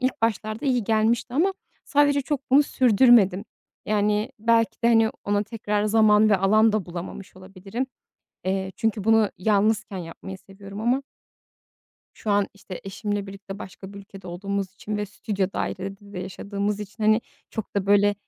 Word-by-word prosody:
ilk 255 Hz, -3 st, -1 dB
başlarda 220 Hz, +4 st, -1 dB
iyi 250 Hz, -4 st, +1 dB
gelmişti 225 Hz, +3 st, +1 dB
ama 375 Hz, +7 st, +2 dB, 0.3 s
sadece 285 Hz, 0 st, +3 dB
çok 275 Hz, -1 st, -4 dB
bunu 280 Hz, +3 st, +7 dB
sürdürmedim. 230 Hz, -6 st, +4 dB, 0.4 s
Yani, 210 Hz, 0 st, +1 dB
belki 230 Hz, +1 st, +2 dB
de, 235 Hz, -, +4 dB
hani, 225 Hz, -1 st, +4 dB
ona 205 Hz, 0 st, +1 dB
tekrar 210 Hz, -1 st, -2 dB
zaman 215 Hz, 0 st, +5 dB
ve 200 Hz, -, +5 dB
alan 215 Hz, +3 st, +4 dB
da 215 Hz, -5 st, -1 dB
bulamamış 180 Hz, +2 st, -8 dB
olabilirim. 195 Hz, +6 st, -6 dB, 0.6 s
Eee, 190 Hz, 0 st, -1 dB
çünkü 220 Hz, -3 st, -1 dB
bunu 225 Hz, -2 st, +4 dB
yalnızken 210 Hz, +1 st, +1 dB
yapmayı 180 Hz, +3 st, -8 dB
seviyorum 195 Hz, +1 st, -11 dB
ama 245 Hz, +4 st, +1 dB, 1.1 s
Şu 215 Hz, -, -4 dB
an, 205 Hz, -1 st, +2 dB
işte, 195 Hz, -2 st, -9 dB
eşimle 205 Hz, +1 st, -3 dB
birlikte 195 Hz, 0 st, -9 dB
başka 190 Hz, 0 st, -10 dB
bir 200 Hz, -, -9 dB
ülkede 195 Hz, -1 st, -12 dB
olduğumuz 195 Hz, +2 st, -3 dB
için 210 Hz, +1 st, -5 dB
ve 210 Hz, 0 st, -2 dB
stüdyo 200 Hz, -1 st, -2 dB
dairede 195 Hz, +1 st, -3 dB, 0.2 s
de 180 Hz, -, -6 dB
yaşadığımız 200 Hz, +2 st, -3 dB
için, 210 Hz, +2 st, -8 dB
hani, 215 Hz, +1 st, +4 dB, 0.3 s
çok 220 Hz, -3 st, -6 dB
da 195 Hz, -1 st, 0 dB
böyle, 205 Hz, 0 st, +4 dB
210 Hz, 160 wpm, -24 LUFS, 195-225 Hz, 1.1 s, bunu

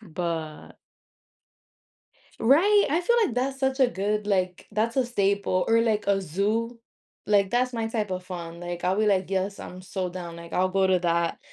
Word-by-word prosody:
But 165 Hz, -5 st, -5 dB, 1.6 s
Right, 370 Hz, -, +5 dB
I 315 Hz, +4 st, +1 dB
feel 475 Hz, +7 st, +2 dB
like 235 Hz, -, -5 dB
that's 265 Hz, +2 st, -1 dB
such 265 Hz, 0 st, 0 dB
a 260 Hz, -, +5 dB
good, 210 Hz, 0 st, -2 dB
like 185 Hz, -3 st, -1 dB
that's 225 Hz, +3 st, -1 dB
a 260 Hz, -, +3 dB
staple 200 Hz, -5 st, 0 dB
or 230 Hz, 0 st, +4 dB
like 220 Hz, -2 st, 0 dB
a 200 Hz, -1 st, +2 dB
zoo. 210 Hz, +7 st, -1 dB, 0.5 s
Like 200 Hz, -2 st, +3 dB
that's 250 Hz, +2 st, +1 dB
my 225 Hz, -2 st, -2 dB
type 220 Hz, -3 st, -2 dB
of 185 Hz, 0 st, -4 dB
fun. 170 Hz, -2 st, -7 dB
Like, 175 Hz, 0 st, -6 dB
I'll 185 Hz, +1 st, +1 dB
be 215 Hz, -, +2 dB
like, 190 Hz, -2 st, +1 dB
yes, 195 Hz, +1 st, -2 dB
I'm 180 Hz, -, -9 dB
sold 185 Hz, -1 st, -4 dB
down. 170 Hz, -2 st, -7 dB
I'll 185 Hz, +1 st, +2 dB
go 190 Hz, 0 st, +2 dB
to 185 Hz, -1 st, +3 dB
that 170 Hz, -1 st, 0 dB
200 Hz, 180 wpm, -26 LUFS, 180-230 Hz, 1.6 s, Right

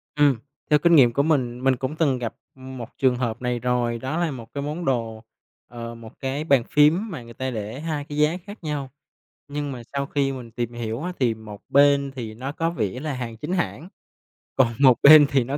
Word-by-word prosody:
Ừm, 145 Hz, -4 st, +4 dB, 0.3 s
theo 150 Hz, -, +5 dB
kinh 170 Hz, +2 st, +5 dB
nghiệm 125 Hz, -6 st, +6 dB
của 140 Hz, +4 st, +2 dB
mình, 130 Hz, -5 st, 0 dB
mình 135 Hz, 0 st, +4 dB
cũng 135 Hz, +4 st, -4 dB
từng 140 Hz, -6 st, +1 dB
gặp, 115 Hz, -2 st, -4 dB, 0.2 s
ừm, 130 Hz, 0 st, -10 dB
một 120 Hz, -2 st, -7 dB
trường 130 Hz, -2 st, +3 dB
hợp 120 Hz, -2 st, -3 dB
này 125 Hz, -1 st, -1 dB
rồi. 120 Hz, -1 st, 0 dB
Đó 130 Hz, +7 st, -3 dB
là 170 Hz, -3 st, 0 dB
1 115 Hz, -4 st, -9 dB
cái 140 Hz, -, -3 dB
món 155 Hz, +4 st, -4 dB
đồ, 115 Hz, -4 st, -2 dB, 0.4 s
ờ, 115 Hz, 0 st, -7 dB
một 115 Hz, -1 st, -13 dB
cái 135 Hz, +3 st, -2 dB
bàn 140 Hz, -6 st, +3 dB
phím 160 Hz, +9 st, +4 dB
mà 135 Hz, -8 st, -6 dB
người 115 Hz, 0 st, -12 dB
ta 130 Hz, +2 st, -3 dB
để 110 Hz, +3 st, -5 dB
2 155 Hz, -2 st, -3 dB
cái 145 Hz, 0 st, -7 dB
giá 150 Hz, +3 st, +2 dB
khác 205 Hz, -1 st, -11 dB
nhau, 145 Hz, -3 st, -3 dB, 0.6 s
nhưng 145 Hz, 0 st, -4 dB
mà 125 Hz, -2 st, -7 dB
sau 140 Hz, 0 st, -1 dB
khi 140 Hz, -1 st, 0 dB
mình 125 Hz, -4 st, -8 dB
tìm 120 Hz, 0 st, -4 dB
hiểu 115 Hz, +2 st, -4 dB
á 180 Hz, -, -3 dB
thì 120 Hz, -3 st, +2 dB
một 110 Hz, -2 st, -11 dB
bên 140 Hz, 0 st, +4 dB
thì 115 Hz, -4 st, -6 dB
nó 130 Hz, +5 st, -5 dB
có 165 Hz, +2 st, -1 dB
vẻ 120 Hz, -, -2 dB
là 150 Hz, +1 st, -3 dB
hàng 120 Hz, -3 st, -5 dB
chính 150 Hz, +10 st, -4 dB
hãng, 175 Hz, -1 st, -2 dB, 0.7 s
còn 120 Hz, -3 st, +3 dB
một 130 Hz, -3 st, +6 dB
bên 150 Hz, 0 st, +10 dB
thì 135 Hz, -3 st, +2 dB
nó 135 Hz, +4 st, -3 dB
130 Hz, 230 wpm, -24 LUFS, 120-150 Hz, 0.7 s, bên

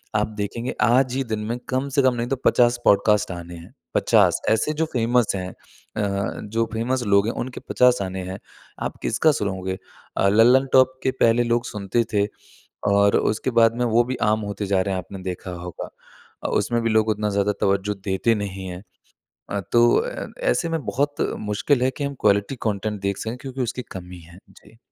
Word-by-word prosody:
आप 105 Hz, 0 st, +2 dB
देखेंगे 115 Hz, +4 st, -3 dB
आज 125 Hz, +4 st, +3 dB
ही 135 Hz, -, 0 dB
दिन 110 Hz, -2 st, -3 dB
में 120 Hz, -, -1 dB
कम 130 Hz, +2 st, 0 dB
से 140 Hz, +1 st, +2 dB
कम 130 Hz, -1 st, +4 dB
नहीं 120 Hz, 0 st, -2 dB
तो 135 Hz, -, +1 dB
50 120 Hz, 0 st, +4 dB
पॉडकास्ट 100 Hz, 0 st, +3 dB
आने 85 Hz, 0 st, -7 dB
हैं। 85 Hz, 0 st, -13 dB, 0.2 s
50 -, -, +3 dB
ऐसे 110 Hz, +8 st, +1 dB
जो -, -, +3 dB
फ़ेमस 120 Hz, -1 st, +2 dB
हैं। 90 Hz, -1 st, -4 dB
अ, 100 Hz, 0 st, -5 dB
जो 115 Hz, +2 st, -1 dB
फ़ेमस 120 Hz, +3 st, -1 dB
लोग 100 Hz, +1 st, +4 dB
हैं 115 Hz, -, -1 dB
उनके 125 Hz, 0 st, -7 dB
50 125 Hz, -3 st, +4 dB
आने 95 Hz, 0 st, -4 dB
हैं 95 Hz, -, -5 dB, 0.5 s
आप -, -, -12 dB
किसका 160 Hz, -, +3 dB
सुनोगे। 95 Hz, -4 st, -3 dB, 0.4 s
अ, 100 Hz, -, +3 dB
लल्लनटॉप 130 Hz, +4 st, +5 dB
के 130 Hz, -, +2 dB
पहले 115 Hz, +1 st, +4 dB
लोग 120 Hz, 0 st, 0 dB
सुनते 105 Hz, +2 st, -1 dB
थे 100 Hz, -1 st, +3 dB, 0.7 s
और 100 Hz, 0 st, +4 dB
उसके 110 Hz, +4 st, -1 dB
बाद 115 Hz, 0 st, +4 dB
में 125 Hz, -, +1 dB
वो 120 Hz, +1 st, +3 dB
भी 130 Hz, +1 st, -3 dB, 0.2 s
आम 110 Hz, 0 st, +1 dB
होते 100 Hz, +1 st, -4 dB
जा 95 Hz, -1 st, +2 dB
रहे 95 Hz, +1 st, -1 dB
हैं -, -, -1 dB
आपने 95 Hz, +2 st, -9 dB
देखा 90 Hz, 0 st, -5 dB
होगा। 90 Hz, -1 st, -7 dB, 0.5 s
अ, -, -, -1 dB
उसमें 120 Hz, +3 st, 0 dB
भी 115 Hz, -, +1 dB
लोग 110 Hz, 0 st, +2 dB
उतना 105 Hz, 0 st, 0 dB
ज़्यादा 100 Hz, 0 st, +1 dB
तवज़्ज़ो 100 Hz, +1 st, +1 dB, 0.2 s
देते 105 Hz, +4 st, +2 dB
नहीं 95 Hz, -2 st, -5 dB
हैं। 90 Hz, +1 st, -7 dB, 0.7 s
अ, 100 Hz, -, -2 dB
तो 120 Hz, 0 st, +6 dB
अ, -, -, -3 dB, 0.2 s
ऐसे 170 Hz, -, +1 dB
में 165 Hz, -3 st, -2 dB
बहुत 145 Hz, +2 st, -1 dB, 0.3 s
मुश्किल 125 Hz, +6 st, +1 dB
है 130 Hz, -, +2 dB
कि 145 Hz, -, -3 dB
हम 140 Hz, -, -3 dB
क्वालिटी 100 Hz, +4 st, +2 dB
कंटेंट 105 Hz, 0 st, -2 dB
देख 100 Hz, 0 st, -1 dB
सकें। 115 Hz, +2 st, -4 dB
क्योंकि 135 Hz, 0 st, -5 dB
उसकी 125 Hz, +1 st, -2 dB
कमी 90 Hz, -1 st, -8 dB
है। 85 Hz, -, -14 dB
जी। 110 Hz, +2 st, -20 dB
110 Hz, 200 wpm, -23 LUFS, 100-125 Hz, 0.7 s, तो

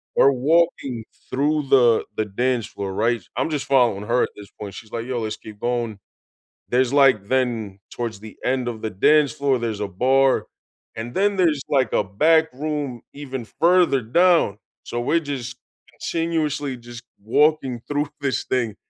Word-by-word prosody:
We're 140 Hz, -, +6 dB, 0.3 s
walking 135 Hz, -9 st, 0 dB, 0.2 s
through 145 Hz, +1 st, 0 dB
the 120 Hz, -4 st, +5 dB
the 110 Hz, -, 0 dB
dance 120 Hz, +3 st, -1 dB
floor, 100 Hz, -1 st, -5 dB
right? 115 Hz, +3 st, +1 dB, 0.2 s
I'm 130 Hz, -, 0 dB
just 150 Hz, -3 st, -2 dB
following 120 Hz, -7 st, +2 dB
her 120 Hz, +1 st, +2 dB
at -, -, -1 dB
this 105 Hz, -1 st, -12 dB
point, 100 Hz, -2 st, -7 dB
she's 110 Hz, -2 st, -11 dB
like, 115 Hz, 0 st, -4 dB
"Yo, 125 Hz, -1 st, -2 dB
let's 110 Hz, -1 st, -3 dB
keep 110 Hz, -1 st, -12 dB
going." 120 Hz, -3 st, -2 dB, 0.7 s
There's, 125 Hz, +1 st, +2 dB
like 130 Hz, -8 st, +4 dB
Then 115 Hz, -7 st, -1 dB
towards 115 Hz, -4 st, -5 dB
the 110 Hz, 0 st, -11 dB
end 125 Hz, -1 st, 0 dB
of 115 Hz, -2 st, -5 dB
the 110 Hz, -, -2 dB, 0.2 s
dance 150 Hz, -3 st, +4 dB
floor, 140 Hz, -1 st, +1 dB
there's 115 Hz, -3 st, -3 dB
a 105 Hz, -, -2 dB, 0.2 s
bar, 135 Hz, +1 st, +3 dB, 0.5 s
and 115 Hz, +2 st, -6 dB
then 205 Hz, +1 st, +2 dB
there's, 165 Hz, -6 st, +2 dB
like, 130 Hz, -5 st, +1 dB
a -, -, +3 dB
back 160 Hz, -, +3 dB
room 145 Hz, -3 st, -4 dB
even 135 Hz, -4 st, -6 dB
further 170 Hz, +2 st, +3 dB
down, 165 Hz, -, +3 dB, 0.3 s
so 120 Hz, -, -4 dB
we're 165 Hz, +8 st, +1 dB
just 125 Hz, -1 st, -6 dB, 0.3 s
continuously 150 Hz, -5 st, -2 dB
just 120 Hz, -1 st, -11 dB, 0.2 s
walking 130 Hz, +2 st, +2 dB
through 145 Hz, +1 st, 0 dB
this 140 Hz, -2 st, -1 dB
thing, 115 Hz, -5 st, -1 dB
125 Hz, 170 wpm, -22 LUFS, 115-145 Hz, 0.7 s, We're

